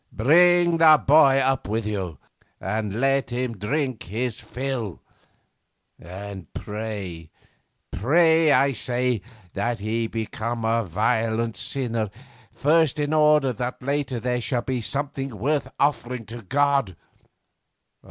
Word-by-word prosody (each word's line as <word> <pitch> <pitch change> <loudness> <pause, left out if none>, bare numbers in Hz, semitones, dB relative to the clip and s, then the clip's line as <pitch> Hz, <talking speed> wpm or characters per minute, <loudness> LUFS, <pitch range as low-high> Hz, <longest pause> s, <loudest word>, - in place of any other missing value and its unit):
'Bring 170 +7 +4
the 155 -2 +7
boy 140 -2 +6
up 135 -1 +1
with 110 +1 -2
you, 95 -7 -3 0.4
and 105 +1 -3
let 135 0 +1
him 125 -1 -3
drink 130 +4 -2
his 115 +4 -3
fill. 125 -5 -4 1.0
And 95 0 -9
pray, 100 -7 -6 0.6
pray, 160 - +3
I 140 +1 +4
say, 125 -2 -1 0.3
that 120 0 -1
he 110 +2 -2
become 115 +1 -4
a 115 +1 +1
violent 110 +4 0
sinner 115 -5 -2 0.4
first 155 0 +2
in 145 +1 -1
order 150 -4 +4
that 125 +3 -5
later 140 -2 -1
there 125 +1 -1
shall 120 0 -1
be 130 -1 -2
something 135 -1 -3
worth 145 +7 -1
offering 125 -4 0
to 115 +2 -9
God. 135 - +1
120 Hz, 120 wpm, -24 LUFS, 110-140 Hz, 1.0 s, the